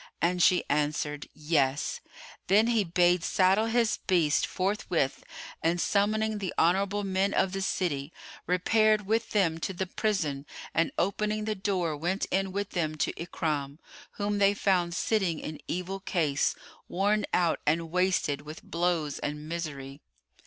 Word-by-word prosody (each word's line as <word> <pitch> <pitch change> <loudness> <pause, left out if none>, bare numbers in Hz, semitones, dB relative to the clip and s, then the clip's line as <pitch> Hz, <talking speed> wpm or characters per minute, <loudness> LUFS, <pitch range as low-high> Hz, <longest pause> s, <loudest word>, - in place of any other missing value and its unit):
And 180 +1 +1
she 180 0 +5
answered, 150 0 -1
"Yes." 150 -3 0 0.5
Then 210 +3 +5
he 230 -3 +2
bade 175 0 +3
saddle 190 +5 +3
his 230 -1 +2
beast 165 -5 +3
forthwith 185 -7 -1 0.4
and, 170 +2 +1
summoning 215 +3 +1
the 190 -3 -4
honourable 195 +4 +2
men 195 +1 0
of 190 -1 +2
the 195 +1 -3
city, 155 -6 -1 0.4
repaired 215 +4 +3
with 225 +2 0
them 170 -6 +1
to 190 - -3
the 190 +1 -2
prison 160 -9 -2 0.3
and 165 +1 +1
opening 210 +3 0
the 215 - 0
door, 190 -5 -1
went 175 +6 -1
in 195 0 0
with 200 +1 -3
them 155 -4 -1
to 155 - -1
Ikrimah, 150 -5 -3 0.4
whom 205 0 -1
they 200 0 +4
found 180 -4 +1
sitting 190 -7 +1
in 155 0 -6
evil 180 +2 -3
case, 160 -7 0 0.3
worn 205 +3 +1
out 175 -2 +2
and 165 +1 +1
wasted 180 -5 +1
with 150 +2 -10
blows 170 -4 -1
and 150 +1 -4
misery. 145 -4 -5
180 Hz, 145 wpm, -28 LUFS, 155-200 Hz, 0.5 s, she